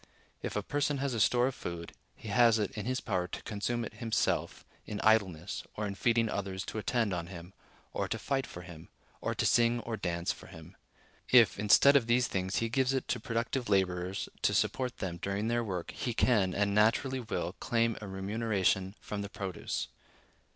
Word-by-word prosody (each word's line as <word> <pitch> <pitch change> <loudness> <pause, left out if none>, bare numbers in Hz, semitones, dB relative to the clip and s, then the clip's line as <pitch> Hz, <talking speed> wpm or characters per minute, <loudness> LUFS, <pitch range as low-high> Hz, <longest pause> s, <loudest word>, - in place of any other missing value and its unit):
If - - -4
a 105 - -1
person 145 +3 0
has 135 -1 -1
a 115 - -1
store 120 +3 +4
of 135 - 0
food, 85 -6 -6 0.2
he 110 - -9
has 115 +2 +5
it 105 -3 -1
in 105 +1 -5
his 130 0 0
power 90 -4 -1
to - - -7
consume 115 +3 -2
it - - -8
himself 115 0 -1 0.2
in 105 - -5
idleness, 100 -5 +2
or 105 - -2
in 100 - -3
feeding 115 +3 +2
others 100 -1 -3
to 110 - -4
attend 110 -2 0
on 85 -1 -3
him, 90 0 -10 0.4
or - - -1
to - - -2
fight 135 0 -1
for 90 - -9
him, 85 -2 -11 0.3
or - - -2
to - - 0
sing 120 0 +4
or 115 0 -4
dance 85 -3 -1
for - - -10
him. - - -12 0.5
If, 115 -7 +6
instead 105 +7 +6
of 125 -5 +4
these 125 +1 +4
things, 95 -4 -2
he 115 - +1
gives 130 +3 +1
it 130 - -1
to 125 - 0
productive 115 +2 -2
laborers 95 -1 0
to - - +2
support 125 -2 0
them 85 -2 -4
during 100 +4 -2
their 120 0 +1
work, 90 -6 -4
he 120 -3 -3
can, 100 -8 +3
and 100 0 +1
naturally 115 +5 +3
will, 95 -6 -3
claim 115 -2 +1
a 105 - -6
remuneration 95 -1 0
from 105 -1 -5
the 100 - -5
produce. 95 -4 -4
105 Hz, 200 wpm, -31 LUFS, 95-120 Hz, 0.5 s, If